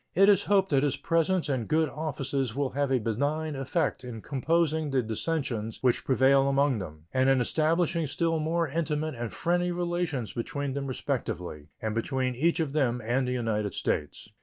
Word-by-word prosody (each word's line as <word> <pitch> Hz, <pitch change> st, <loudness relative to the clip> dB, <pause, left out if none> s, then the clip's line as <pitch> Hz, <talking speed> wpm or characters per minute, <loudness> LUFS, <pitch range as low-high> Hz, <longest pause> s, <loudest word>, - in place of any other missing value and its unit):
It 195 Hz, +2 st, +6 dB
is 200 Hz, -1 st, +4 dB
hoped 195 Hz, -1 st, +3 dB
that 135 Hz, -2 st, +4 dB
his 145 Hz, -2 st, 0 dB
presence 165 Hz, +2 st, +1 dB
and 130 Hz, -6 st, -1 dB
good 160 Hz, +1 st, +2 dB
offices 135 Hz, -5 st, -3 dB
will 140 Hz, -1 st, -1 dB
have 140 Hz, +1 st, 0 dB
a 130 Hz, -, +4 dB
benign 145 Hz, +7 st, -1 dB
effect 135 Hz, 0 st, -1 dB
in 120 Hz, -3 st, -6 dB
composing 160 Hz, +3 st, 0 dB
the 135 Hz, -2 st, +1 dB
dissensions 115 Hz, -2 st, -2 dB
which 125 Hz, -2 st, +2 dB
prevail 135 Hz, +1 st, +4 dB
among 140 Hz, -3 st, +2 dB
them, 80 Hz, -4 st, -8 dB
and 130 Hz, +1 st, +3 dB
in 135 Hz, -1 st, +4 dB
establishing 165 Hz, +4 st, +1 dB
still 165 Hz, +2 st, 0 dB
more 165 Hz, +2 st, 0 dB
intimate 155 Hz, 0 st, -1 dB
and 120 Hz, -2 st, -5 dB
friendly 175 Hz, +1 st, 0 dB
relations 175 Hz, -8 st, -2 dB
between 140 Hz, +3 st, -3 dB
them 140 Hz, 0 st, -3 dB
respectively 90 Hz, -, -4 dB, 0.2 s
and 110 Hz, -1 st, -1 dB
between 130 Hz, +3 st, -1 dB
each 165 Hz, +8 st, +1 dB
of 155 Hz, -4 st, -1 dB
them 125 Hz, -5 st, +1 dB
and 125 Hz, +3 st, +1 dB
the 125 Hz, -, -1 dB
United 105 Hz, -5 st, -1 dB
States. 75 Hz, -, -2 dB
140 Hz, 180 wpm, -28 LUFS, 125-160 Hz, 0.2 s, It